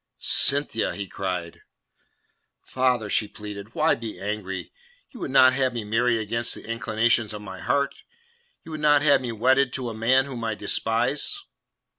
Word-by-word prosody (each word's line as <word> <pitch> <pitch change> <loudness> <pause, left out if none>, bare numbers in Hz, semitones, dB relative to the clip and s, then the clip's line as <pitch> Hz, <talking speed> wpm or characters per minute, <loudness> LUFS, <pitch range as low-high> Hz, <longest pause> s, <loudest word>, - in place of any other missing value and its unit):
"Cynthia!" 140 -5 +3
he 100 -1 -5
cried. 90 -3 -5 1.0
"Father," 125 -4 0
she 105 +1 0
pleaded, 105 +1 -10
"why 160 +1 +3
be 115 -2 -6
angry? 100 -2 -5 0.4
You 245 - -12
would - - -4
not 130 -1 +6
have 130 -1 0
me 115 -2 -4
marry 115 +3 +1
against 115 +2 -1
the - - -10
inclinations 115 -1 0
of 105 0 -8
my 95 -2 -9
heart? 140 0 -1 0.6
You 165 - -10
would 155 -1 -6
not 145 -1 +4
have 145 -2 +4
me 125 -2 -4
wedded 130 +4 +2
to 125 -3 -3
a - - -6
man 125 +4 +2
whom 125 -4 -7
I 110 -1 -2
despise?" 120 - +1
115 Hz, 165 wpm, -24 LUFS, 105-130 Hz, 1.0 s, not